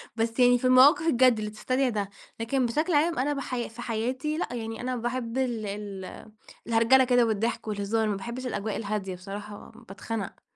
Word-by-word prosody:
بس 225 Hz, +1 st, -1 dB
يعني 245 Hz, 0 st, +6 dB
في 245 Hz, -, -4 dB
المواقف 285 Hz, +7 st, +6 dB
الجد، 250 Hz, -5 st, +4 dB
اللي 210 Hz, 0 st, -4 dB
تستدعي 255 Hz, +5 st, 0 dB
ده. 205 Hz, -3 st, -2 dB, 0.3 s
لكن 250 Hz, +3 st, 0 dB
بشكل 305 Hz, +8 st, 0 dB
عام، 320 Hz, +2 st, +2 dB
أنا 285 Hz, +3 st, +1 dB
بَحَيا 255 Hz, -4 st, -3 dB
في 230 Hz, +2 st, -10 dB
حياتي 255 Hz, +7 st, -2 dB
لأ، 250 Hz, -, -3 dB
يعني 225 Hz, -1 st, -5 dB
أنا 255 Hz, 0 st, -2 dB
باحب 240 Hz, 0 st, -3 dB
ال 240 Hz, -5 st, -1 dB
ال 200 Hz, -2 st, -6 dB, 0.6 s
الهرجلة 230 Hz, +3 st, +5 dB
كده 245 Hz, -1 st, +4 dB
والضحك، 225 Hz, +1 st, -1 dB
والهزار. 215 Hz, +2 st, 0 dB
ما 210 Hz, -, 0 dB
باحبِش 235 Hz, +6 st, -6 dB
الأجواء 210 Hz, -2 st, -3 dB
الهادية، 200 Hz, -3 st, -3 dB
بصراحة 205 Hz, +3 st, -9 dB, 0.2 s
باتخنق. 205 Hz, 0 st, -6 dB
230 Hz, 175 wpm, -27 LUFS, 215-255 Hz, 0.6 s, يعني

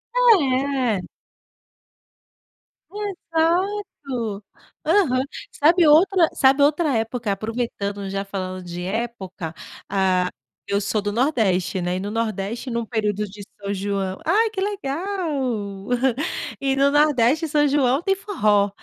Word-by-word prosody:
É. 275 Hz, -, +3 dB, 1.9 s
Exato. 330 Hz, -, -2 dB, 0.4 s
Aham. 265 Hz, -11 st, +3 dB, 0.3 s
Sabe 330 Hz, +3 st, +4 dB
outra 335 Hz, +3 st, +5 dB
sabe 270 Hz, +1 st, +4 dB
outra 295 Hz, -2 st, +2 dB
época? 225 Hz, -1 st, -2 dB
Aproveitando, 205 Hz, -2 st, -3 dB
já 195 Hz, +1 st, -3 dB
falando 185 Hz, -2 st, -5 dB
de 175 Hz, 0 st, -6 dB
época, 190 Hz, -5 st, -4 dB, 0.3 s
ah, 185 Hz, -2 st, +1 dB, 0.4 s
eu 200 Hz, -, +1 dB
sou 210 Hz, +1 st, 0 dB
do 205 Hz, 0 st, -2 dB
nordeste, 205 Hz, -, +1 dB
né, 175 Hz, +1 st, -1 dB
e -, -, -3 dB
no 200 Hz, +2 st, -4 dB
nordeste, 225 Hz, +2 st, -3 dB
num 235 Hz, -1 st, -2 dB
período 210 Hz, -2 st, -1 dB
de 205 Hz, +1 st, -11 dB, 0.2 s
São 200 Hz, 0 st, -3 dB
João 195 Hz, -1 st, -2 dB
Ai, 435 Hz, +7 st, +3 dB
que 395 Hz, -3 st, -3 dB
legal. 280 Hz, -, -3 dB, 0.7 s
E 270 Hz, -1 st, +1 dB
no 275 Hz, +1 st, +3 dB
nordeste, 295 Hz, +1 st, +3 dB
São 295 Hz, 0 st, +3 dB
João 275 Hz, -1 st, +2 dB
tem 390 Hz, +1 st, +2 dB
forró, 210 Hz, -, +1 dB
240 Hz, 120 wpm, -22 LUFS, 200-305 Hz, 1.9 s, outra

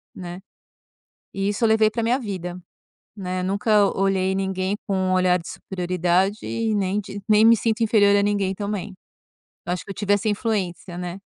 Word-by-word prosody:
né. 175 Hz, 0 st, -7 dB, 0.9 s
E 195 Hz, +1 st, -1 dB
isso 205 Hz, +4 st, -2 dB
eu -, -, +5 dB
levei 220 Hz, 0 st, +4 dB
pra 230 Hz, -, -2 dB
minha 240 Hz, +3 st, +2 dB
vida, 185 Hz, -6 st, -5 dB, 0.6 s
né, 185 Hz, -2 st, -3 dB
nunca 205 Hz, +2 st, +3 dB
olhei 190 Hz, -1 st, +1 dB
ninguém 190 Hz, 0 st, -1 dB
com 195 Hz, -, 0 dB
um 185 Hz, 0 st, +1 dB
olhar 180 Hz, -1 st, +3 dB
de 170 Hz, -, -10 dB
superioridade 180 Hz, +2 st, 0 dB
e 225 Hz, -1 st, -1 dB
nem 200 Hz, 0 st, 0 dB
de 205 Hz, 0 st, -8 dB
nem 215 Hz, 0 st, +5 dB
me 230 Hz, 0 st, +7 dB
sinto 225 Hz, +1 st, -1 dB
inferior 205 Hz, -2 st, +4 dB
a 200 Hz, -, +4 dB
ninguém 200 Hz, -2 st, 0 dB
também, 205 Hz, 0 st, -4 dB, 0.7 s
eu 175 Hz, -, -1 dB
acho 180 Hz, -, -4 dB
que -, -, -17 dB
eu -, -, -8 dB
tive 205 Hz, 0 st, +1 dB
essa 205 Hz, +2 st, +1 dB
influência, 200 Hz, -5 st, -2 dB
né. 180 Hz, +1 st, -5 dB
195 Hz, 185 wpm, -23 LUFS, 185-210 Hz, 0.9 s, me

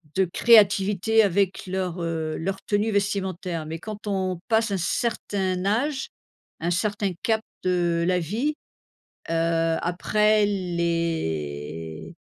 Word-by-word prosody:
de 190 Hz, 0 st, +3 dB
créativité 205 Hz, +1 st, +4 dB
avec 195 Hz, -1 st, 0 dB
leur, 185 Hz, -2 st, -2 dB
heu, 160 Hz, -2 st, -2 dB
leur 195 Hz, +3 st, -3 dB
tenue 210 Hz, +2 st, +1 dB
vestimentaire. 190 Hz, -5 st, -1 dB
Mais 160 Hz, -, -4 dB
quand 210 Hz, +2 st, -8 dB
on 190 Hz, -3 st, -1 dB
passe 225 Hz, -1 st, +2 dB
un 195 Hz, -, +1 dB
certain 190 Hz, -1 st, -1 dB
âge, 265 Hz, +7 st, 0 dB, 0.5 s
un 170 Hz, +2 st, -1 dB
certain 205 Hz, +2 st, 0 dB
cap 220 Hz, -1 st, +2 dB, 0.2 s
de 175 Hz, -2 st, +1 dB
la 180 Hz, 0 st, +3 dB
vie, 230 Hz, -, -1 dB, 0.8 s
heu, -, -, +1 dB, 0.5 s
après, 210 Hz, +4 st, +2 dB
les 80 Hz, -, -2 dB
190 Hz, 115 wpm, -25 LUFS, 170-210 Hz, 0.8 s, créativité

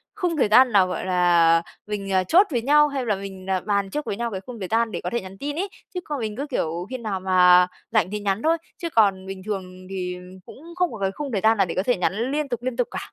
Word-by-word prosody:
khung 355 Hz, -6 st, -1 dB
thời 260 Hz, -, +3 dB
gian 250 Hz, +4 st, +6 dB
nào, 195 Hz, -3 st, +5 dB
gọi 180 Hz, -, -4 dB
là, 175 Hz, -2 st, +4 dB, 0.3 s
mình, 200 Hz, -2 st, -4 dB
à, 185 Hz, -1 st, +3 dB
chốt 360 Hz, -, +4 dB
với 240 Hz, -4 st, 0 dB
nhau, 295 Hz, +4 st, +5 dB
hay 275 Hz, -3 st, -3 dB
là 215 Hz, -3 st, +1 dB
mình, 190 Hz, -1 st, -9 dB
à, 190 Hz, -1 st, +1 dB
bàn 200 Hz, -1 st, -1 dB
trước 300 Hz, +8 st, -4 dB
với -, -, -3 dB
nhau 235 Hz, +2 st, -3 dB
cái 190 Hz, -2 st, -5 dB
khung 235 Hz, +3 st, -10 dB
thời 190 Hz, -, -4 dB
gian 225 Hz, 0 st, +2 dB
để 175 Hz, -, -4 dB
có 175 Hz, -, -3 dB
thể 235 Hz, -, -2 dB
nhắn 190 Hz, 0 st, -11 dB
tin 290 Hz, +6 st, -4 dB
ấy. 385 Hz, +5 st, -2 dB, 0.2 s
Chứ 365 Hz, -, -2 dB
còn 295 Hz, -2 st, -4 dB
mình 215 Hz, -3 st, -4 dB
cứ, 280 Hz, +3 st, -3 dB
kiểu, 170 Hz, -, -2 dB
khi 255 Hz, -, -4 dB
nào 215 Hz, -5 st, -3 dB
mà 180 Hz, -1 st, +5 dB, 0.2 s
rảnh 210 Hz, -5 st, +2 dB
thì 210 Hz, -, -3 dB
nhắn 200 Hz, 0 st, -1 dB
thôi, 325 Hz, +1 st, +3 dB, 0.2 s
chứ 340 Hz, -, -4 dB
còn 200 Hz, -8 st, +2 dB
bình 190 Hz, 0 st, -7 dB
thường 185 Hz, -3 st, -6 dB
thì 180 Hz, -2 st, -4 dB, 0.3 s
cũng 330 Hz, +5 st, -12 dB
không 360 Hz, -2 st, +1 dB
có 225 Hz, -, -8 dB
cái 195 Hz, -1 st, 0 dB
khung 285 Hz, +6 st, -6 dB
thời 200 Hz, -4 st, -1 dB
gian 220 Hz, +2 st, +4 dB
nào 195 Hz, -, +3 dB
để 170 Hz, -, -5 dB
có 185 Hz, -, 0 dB
thể 245 Hz, -, +2 dB
nhắn 215 Hz, +8 st, -1 dB
liên 295 Hz, 0 st, -1 dB
tục, 240 Hz, -2 st, -3 dB
liên 255 Hz, -1 st, -3 dB
tục 245 Hz, -, +1 dB
cả. -, -, -7 dB
210 Hz, 290 wpm, -23 LUFS, 185-255 Hz, 0.3 s, gian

